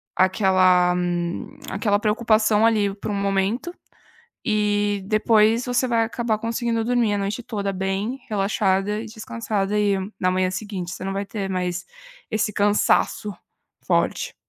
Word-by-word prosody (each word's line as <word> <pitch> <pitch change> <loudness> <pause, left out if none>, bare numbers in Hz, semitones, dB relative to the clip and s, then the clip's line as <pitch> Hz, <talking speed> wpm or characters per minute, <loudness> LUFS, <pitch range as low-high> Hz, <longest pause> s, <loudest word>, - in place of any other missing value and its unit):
aquela 185 -2 +4 0.8
aquela 205 +1 +1
preocupação 215 0 +2
ali, 210 -3 +2
por 210 - -6
um - - -2
momento 200 - -1 0.7
e 205 -2 +1
depois 220 +2 +3
você 250 +1 +1
vai 230 -1 +2
acabar 230 -1 -1
conseguindo 230 0 -1
dormir 240 -3 +1
a 205 - -1
noite 200 +5 -3
toda 200 -4 -3
bem 195 +7 -2
relaxada 200 0 0
e 225 - -7
descansada, 215 -2 -3
e 205 -1 +2 0.3
na 185 0 +2
manhã 185 0 +1
seguinte 185 -2 -5
você - - -7
não 195 - -2
vai 200 +1 -2
ter 195 -1 -4
mais 180 -1 -2 0.5
esse 215 0 0
cansaço 205 0 +2 0.5
forte. - - 0
210 Hz, 135 wpm, -23 LUFS, 195-225 Hz, 0.8 s, aquela